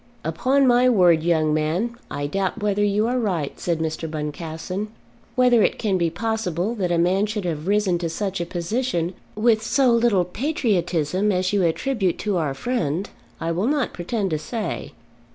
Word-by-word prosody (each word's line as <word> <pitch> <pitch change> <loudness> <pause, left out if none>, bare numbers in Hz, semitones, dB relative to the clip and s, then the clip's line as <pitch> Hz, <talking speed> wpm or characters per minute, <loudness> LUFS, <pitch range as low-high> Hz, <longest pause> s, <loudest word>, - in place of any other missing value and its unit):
"Upon 275 +2 +2
my 250 0 +5
word, 180 -8 +5
young 160 -2 +2
men, 165 +10 0
I 145 0 -3
doubt 190 +7 -1
whether 205 0 +1
you 205 +1 +2
are 250 +2 0
right," 175 - -2
said 170 -2 0
Mr. 160 0 -3
Boncassen. 160 +6 -4 0.5
"Whether 250 -2 +5
it - - +2
can 195 -4 0
be 170 -1 +2
possible 210 0 -2
that 190 -6 -1
a 170 - +2
man 185 +5 +2
should 210 -2 -3
have 160 -1 -3
risen 200 -3 +2
to 170 -1 -2
such 195 +1 -3
a 170 - -3
position 175 0 -1 0.2
with 220 0 +3
so 255 +3 +3
little 230 -6 +3
patriotism 190 - 0
as 185 +1 0
you 200 - +3
attribute 190 +2 0
to 205 -3 -1
our 150 -5 -1
friend, 180 - -2 0.3
I 165 - -2
will 180 +7 0
not 285 -2 0
pretend 195 +2 -2
to 155 - 0
say. 220 +6 -4
190 Hz, 175 wpm, -23 LUFS, 170-225 Hz, 0.5 s, my